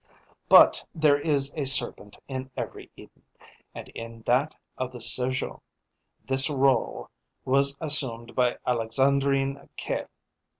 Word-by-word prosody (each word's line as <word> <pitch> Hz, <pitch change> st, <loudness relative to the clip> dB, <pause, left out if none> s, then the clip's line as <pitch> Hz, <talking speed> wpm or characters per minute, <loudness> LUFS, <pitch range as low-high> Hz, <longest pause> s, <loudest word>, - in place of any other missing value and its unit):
But -, -, +6 dB
there 150 Hz, -3 st, +2 dB
is 145 Hz, -2 st, 0 dB
a 150 Hz, -, -3 dB
serpent 115 Hz, -6 st, +2 dB
in 130 Hz, -1 st, -7 dB
every 115 Hz, -5 st, -7 dB
Eden, -, -, -18 dB, 0.5 s
and -, -, -9 dB
in 115 Hz, 0 st, -11 dB
that 135 Hz, +5 st, 0 dB, 0.2 s
of 130 Hz, -1 st, -5 dB
the 125 Hz, -, -11 dB
Sergeot 125 Hz, +3 st, +1 dB, 0.7 s
this 135 Hz, 0 st, +4 dB
rôle 135 Hz, -2 st, -1 dB, 0.4 s
was 140 Hz, +1 st, +2 dB
assumed 130 Hz, -7 st, +1 dB
by 125 Hz, -1 st, 0 dB
Alexandrine 135 Hz, +3 st, -1 dB
Caille. -, -, -5 dB
135 Hz, 120 wpm, -25 LUFS, 125-140 Hz, 0.7 s, But